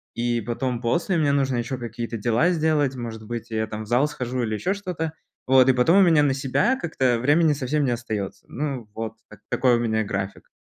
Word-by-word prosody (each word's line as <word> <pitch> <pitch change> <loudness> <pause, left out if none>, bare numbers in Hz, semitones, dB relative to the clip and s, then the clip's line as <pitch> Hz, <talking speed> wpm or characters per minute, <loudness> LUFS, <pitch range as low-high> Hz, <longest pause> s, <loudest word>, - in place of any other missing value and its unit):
и 120 0 0
потом 120 +2 -2
после 170 +9 0
мне 150 -3 +2
нужно 135 -3 +1
ещё 120 +2 -3
какие-то 115 -1 -5
дела 120 - +2
сделать, 155 -5 +1
может 115 -3 -6
быть, 120 0 -5
я 110 0 0
там 110 0 -6
в - - -12
зал 125 +6 +3
схожу 125 -4 -3
или 110 -2 -2
ещё 180 - -1
что-то, 175 -6 -4 0.3
вот, 130 0 +6
и - - +6
потом 130 +9 +4
у - - +7
меня 165 -5 +5
на 140 -2 +2
себя 140 - +1
как-то 130 - 0
времени 150 +5 +3
совсем 145 +1 -1
не 125 - +1
остаётся. 105 -5 -4
Ну, 135 -5 -4
вот, 110 0 -4
так 105 -1 -15
такой 125 -2 +3
у - - -2
меня 110 -2 0
график. 100 -1 -5
125 Hz, 215 wpm, -24 LUFS, 115-150 Hz, 0.3 s, у